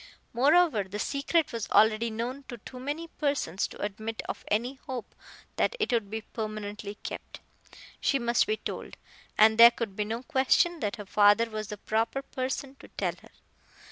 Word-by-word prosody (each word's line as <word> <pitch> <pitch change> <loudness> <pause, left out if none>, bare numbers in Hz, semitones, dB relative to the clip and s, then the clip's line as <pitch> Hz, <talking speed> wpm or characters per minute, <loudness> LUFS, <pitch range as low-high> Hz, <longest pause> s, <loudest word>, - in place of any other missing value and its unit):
Moreover, 285 - +4
the 190 +2 -6
secret 285 +7 0
was 230 -2 -4
already 220 +2 +4
known 235 +5 -4
to 240 - -7
too 250 +3 -10
many 295 +6 -4
persons 280 - -1
to - - -13
admit 220 +2 -4
of - - -5
any 245 +6 -1
hope 250 -5 -5 0.4
that - - +1
it 430 -12 0
would 225 -4 0
be 220 +1 -4
permanently 210 -2 -6
kept. - - -7 0.6
She 275 - +2
must 235 +3 +2
be 430 +1 0
told, - - -6 0.4
and 220 +1 +6
there 235 0 +12
could 230 -4 -5
be 210 - -1
no 225 +3 -4
question 270 +7 +2
that 210 -5 -2
her 210 -3 -8
father 205 +3 +4
was 215 -1 -4
the 210 - -6
proper 225 +6 -1
person 265 +1 -4
to - - -13
tell - - -2
her. - - -17
230 Hz, 175 wpm, -28 LUFS, 215-270 Hz, 0.6 s, there